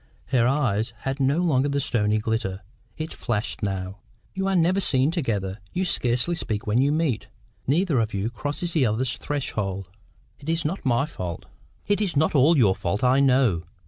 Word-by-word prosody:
Her 120 -3 +3
eye 125 -6 +1 0.2
had 135 +1 -3
no 135 +3 +2
longer 145 -5 +2
the 140 0 0
stony 110 -5 +1
glitter. 105 -3 -2 0.4
It 160 +1 -5
flashed 110 -2 -3
now. 95 -1 -3 0.3
"You 190 0 -2
are 195 - +1
never 180 +2 +3
seen 140 -5 +2
together. 105 - -2
You 185 +1 0
scarcely 125 0 +2
speak 110 -10 -3
when 110 +4 +2
you 140 +2 +3
meet. 150 -8 0 0.4
Neither 155 0 +2
of 110 -1 0
you 100 +3 -2
crosses 145 +8 -3
the 140 -7 +3
other's 115 +4 0
threshold." 100 -10 -3 0.5
"It 150 - -7
is 165 -1 0
not 175 +6 -2
my 125 +1 +2
fault." 90 - -6 0.4
"It 205 +1 +1
is 185 -8 0
not 155 +3 +2
ALL 150 +3 +5
your 105 -8 +5
fault, 95 +4 -2
I 130 +2 +4
know. 125 -11 +3
130 Hz, 180 wpm, -24 LUFS, 105-155 Hz, 0.5 s, ALL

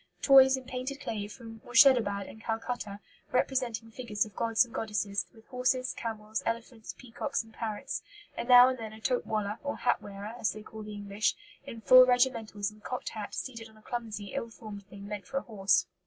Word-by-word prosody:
Toys 265 -1 +8
in 260 - -8
painted 255 +2 -5
clay 210 -6 -4
from 225 +1 -11
Morshedabad 230 -6 +5
and 220 - -12
Calcutta, 225 -3 -3 0.3
representing 245 -3 0
figures 220 -4 -1
of 210 -3 -14
gods 230 +1 +3
and 235 - -17
goddesses, 210 -4 -1
with 225 -2 -19
horses, 255 0 0
camels, 220 -1 -4
elephants, 230 0 -4
peacocks, 255 +3 -3
and 225 0 -18
parrots, 215 -3 -4 0.3
and 235 - -4
now 245 0 +10
and 260 -1 -1
then 220 -1 -6
a 220 - -11
'tope 250 +3 0
walla,' 210 0 -2
or 285 0 -3
hat - - +1
wearer, 200 +2 -7
as 220 - +1
they 215 - -9
call 220 0 -10
the 210 0 -7
English, 205 +1 -1 0.3
in 230 - -8
full 255 +2 +9
regimentals 230 -5 +1
and 210 0 -19
cocked 250 - -4
hat, 210 -2 -6
seated 230 -4 -5
on 220 - -20
a - - -18
clumsy, 215 -5 -5
ill 230 - -3
formed 215 -3 -9
thing 200 -1 -10
meant 205 -3 -6
for 270 - -3
a - - +1
horse. 195 -5 +2
225 Hz, 200 wpm, -30 LUFS, 210-250 Hz, 0.3 s, now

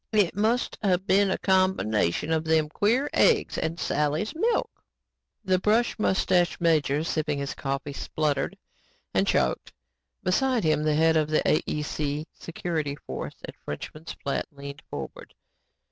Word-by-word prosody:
"It 205 -6 +2
must 225 +4 0
of 185 -3 +1
been 200 0 +4
the 190 - 0
combination 165 - +1
of 160 -1 +1
them 160 -1 +2
queer 230 - +1
eggs - - +3
and 165 +2 -2
Sally's 150 +7 0
milk." 445 +8 0 0.7
The 185 -1 +3
brush 220 +4 +2
mustached 185 -3 +2
major 155 -3 +2
sipping 155 -3 -1
his 140 0 -3
coffee, 140 +1 -4
spluttered 145 -1 -1 0.6
and - - +2
choked. - - +1 0.5
Beside 250 +5 +2
him, 155 -2 +2
the 155 -1 +1
head 160 +1 +4
of 155 -1 +1
the 155 - +2
AEC 150 0 -1
security 160 -4 -3
force - - -5
at - - -8
Frenchman's 155 - -7
Flat 140 - -1
leaned 140 0 -9
forward. - - -8
160 Hz, 140 wpm, -26 LUFS, 150-190 Hz, 0.7 s, been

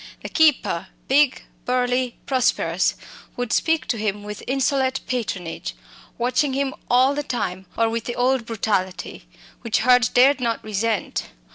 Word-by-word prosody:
The - - -5
keeper 300 - +2 0.2
big, 280 0 +3 0.2
burly, 250 0 0
prosperous 260 -2 +1 0.4
would 245 -2 -2
speak 320 -1 +2
to 230 - 0
him 210 -1 -2
with 210 0 -7
insolent 270 0 +1
patronage, 195 - -4 0.4
watching 255 +4 +1
him 270 0 -1 0.2
all 255 +3 +4
the 295 - -1
time, 190 -9 -3
or 230 - +3
with 230 0 -3
the 240 - -4
old 250 -1 +1
brutality, 200 -4 -2 0.3
which 230 -2 0
Hurd 250 +1 +5
dared 270 +2 +5
not 230 -2 -1
resent. 215 0 -2
245 Hz, 140 wpm, -22 LUFS, 220-265 Hz, 0.4 s, Hurd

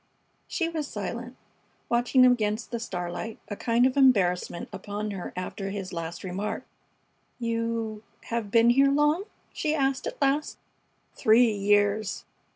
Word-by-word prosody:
She 335 - -1
was 315 -3 -3
silent, 240 +4 -5 0.5
watching 245 +2 +3
him 250 - +7
against 215 -1 -1
the 235 - -2
starlight, 180 0 -4
a 205 - -3
kind 235 +3 +2
of 260 0 +2
embarrassment 195 -11 +3
upon 210 +1 -4
her 190 -3 -5
after 190 +2 -4
his 195 -2 -5
last 170 0 -5
remark. 190 +3 -3 0.7
"You 230 -2 -2 0.2
have 230 -3 -3
been 230 +2 +5
here 275 +3 +5
long?" 295 +6 +2 0.3
she 310 -1 0
asked, 270 -2 0
at - - -6
last. 280 +2 +1 0.6
"Three 225 +2 +5
years." 205 +1 +1
230 Hz, 140 wpm, -27 LUFS, 205-255 Hz, 0.7 s, him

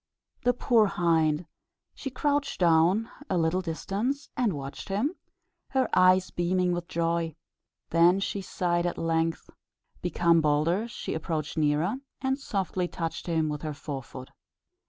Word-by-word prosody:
The 245 0 +2
poor 230 -3 +4
hind! 165 -3 +2 0.5
she 270 - -5
crouched 285 +2 -1
down 175 +5 +4
at 290 - -14
a 185 - +1
little 165 +2 +1
distance, 205 - -3
and 240 -6 +1
watched 140 +2 -7
him, 220 - 0 0.6
her 265 -1 +1
eyes 185 0 +5
beaming 180 +1 +1
with 175 -1 -3
joy. 165 -2 -1 0.6
Then 170 +3 +5
she 200 0 -2
sighed: 175 -2 0
at 175 - -3
length, 165 0 -1 0.5
become 170 -1 +3
bolder, 155 +8 +2
she 235 - -5
approached 160 -1 -3
nearer, 155 - +1 0.2
and 265 +1 0
softly 190 -7 -2
touched 165 0 -4
him 160 -2 +1
with 150 -1 -3
her 155 -2 -4
fore 140 -1 -5
foot. 130 0 -11
175 Hz, 145 wpm, -28 LUFS, 160-200 Hz, 0.6 s, eyes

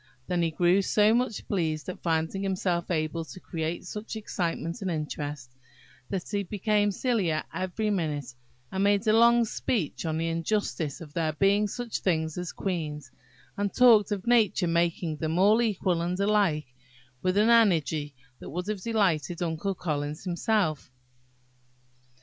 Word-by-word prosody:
Then 175 +3 0
he 165 - +2
grew 175 +4 +3
so 210 +2 +3
much 240 -3 -1
pleased 160 -6 -1
at 185 - -6
finding 165 +3 0
himself 185 -3 -1
able 165 -1 -1
to 160 - -11
create 165 0 -4
such 210 +4 -6
excitement 170 -3 -3
and 190 - -2
interest, 150 -4 -4 0.6
that 190 -3 -3
he 205 -1 -1
became 205 +1 +1
sillier 195 -9 0
every 185 +4 -2
minute, 150 -9 -2 0.4
and 190 +1 0
made 205 +2 +3
a 215 - +4
long 235 +1 +5
speech 210 - -2
on 160 0 -1
the 165 +1 -1
injustice 165 -2 -2
of 150 -3 -10
there 160 -2 0
being 200 +6 +3
such 240 +2 -4
things 160 -4 0
as 180 -1 -4
queens, 150 -8 -4 0.4
and 200 -1 -2
talked 225 -5 +6
of 200 -2 -2
nature 230 -6 +3
making 170 -1 0
them 160 +2 -2
all 210 +5 +5
equal 185 -6 0
and 175 +2 -2
alike, 195 -10 +1 0.5
with 185 +1 +1
an 215 +3 +5
energy 160 - +3 0.2
that - - -9
would 180 +5 -4
have 210 -3 -3
delighted 180 -7 0
Uncle 170 +4 -2
Collins 150 -3 -3
himself. 180 -4 0
180 Hz, 155 wpm, -27 LUFS, 160-205 Hz, 0.6 s, talked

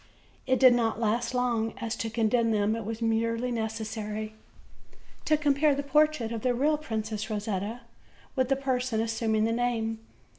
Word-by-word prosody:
It 260 0 +2
did 255 -2 +8
not 230 -2 0
last 230 +2 0
long, 235 -3 0
as 230 -3 -3
to 225 - -2
condemn 230 +1 +1
them 215 0 +1
it 225 -2 -5
was 225 +1 -4
merely 230 +2 0
necessary 220 -1 -4 0.9
to 310 - +3
compare 295 0 +3
the 285 - -2
portrait 300 -5 +2
of 230 -2 -3
the 250 0 +1
real 295 +4 +2
Princess 220 -6 -4
Rosetta 210 +2 -3 0.5
with 260 -2 +1
the 270 - +3
person 255 -4 -1
assuming 225 -1 0
the 225 - +1
name. 230 -2 -1
230 Hz, 160 wpm, -28 LUFS, 220-250 Hz, 0.9 s, did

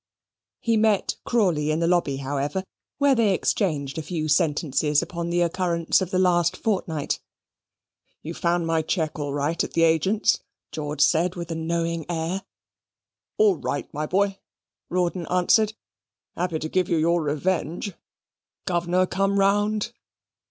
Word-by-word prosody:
He 230 -1 +1
met 215 -2 +2
Crawley 175 -10 +1
in 155 +1 +1
the 170 - +1
lobby, 170 -5 +2
however, 140 +6 -2 0.3
where 280 -1 +4
they 220 -6 +3
exchanged 150 -10 -1
a - - -2
few 155 -1 -3
sentences 150 -1 +2
upon 170 -1 -4
the 175 0 +1
occurrences 170 0 +1
of 185 - -2
the 185 - 0
last 175 -1 +2
fortnight. 175 -8 -1 1.0
"You 160 - -5
found 170 0 0
my 165 -1 +1
cheque 160 -1 -2
all 145 -1 -2
right 145 +4 0
at - - -6
the 165 - +3
agent's? 190 +7 +3 0.3
George 150 -1 -3
said, 170 +4 +3
with 170 -1 -6
a - - -2
knowing 165 0 -2
air. 170 +3 -2 1.0
"All 425 -3 +4
right, 145 - -4
my 150 +1 -2
boy," 195 +2 +1 0.5
Rawdon 180 -1 -1
answered. 205 +4 +3 0.6
"Happy 175 -2 -1
to 155 - -4
give 180 +2 0
you 170 - +2
your 170 +2 +2
revenge. 165 +4 -1 0.7
Governor 175 0 +1
come 195 +2 0
round?" 205 +3 +2
170 Hz, 145 wpm, -24 LUFS, 155-190 Hz, 1.0 s, where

